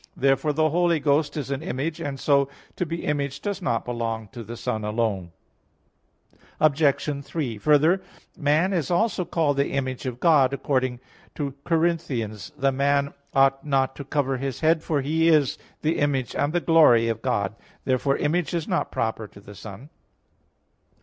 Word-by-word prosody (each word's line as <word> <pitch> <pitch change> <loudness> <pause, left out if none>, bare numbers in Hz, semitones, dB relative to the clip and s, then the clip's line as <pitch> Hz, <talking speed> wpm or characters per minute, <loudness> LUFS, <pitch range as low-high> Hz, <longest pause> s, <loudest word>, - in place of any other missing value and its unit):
Therefore 135 +2 +2
the 155 +1 +1
Holy 170 -1 +2
Ghost 145 +1 +1
is 140 -2 -4
an 140 +1 -2
Image; 155 +2 -3
and 135 -1 -4
so 140 -2 +3 0.3
to 180 - -2
be 165 +1 -4
Image 140 -2 -1
does 200 -2 -4
not 115 -9 -1
belong 115 -3 -3
to 120 -2 -8
the 115 +2 -8
Son 110 -1 -3
alone. 105 -5 -1 1.3
Obj. 145 -1 +2
3: 135 -7 -3
Further, 155 - +4 0.3
man 155 +5 +2
is 165 -7 -1
also 185 +2 +1
called 155 -4 0
the 140 - +1
image 130 -1 -3
of 125 -1 -5
God, 140 -5 +4
according 130 -3 -1 0.4
to 150 - -3
1 - - -29
Cor. 165 - +2
11:7, 125 - -2
"The 135 0 +2
man 140 +1 +1 0.2
ought 135 0 +4
not 135 -2 +1
to 140 - -5
cover 135 -2 -1
his 135 -1 -4
head, 160 0 +3
for 150 -3 -1
he 160 +4 +1
is 155 -5 +3 0.2
the 160 +2 +1
image 135 -4 0
and 145 - 0
the 175 +1 0
glory 150 -10 +5
of 115 -1 -2
God." 105 -6 -1 0.3
Therefore 135 +1 +1
Image 170 +3 0
is 165 -2 -2
not - - -1
proper 110 -1 -2
to 100 - -16
the 100 +1 -13
Son. 100 - -11
140 Hz, 175 wpm, -24 LUFS, 125-155 Hz, 1.3 s, glory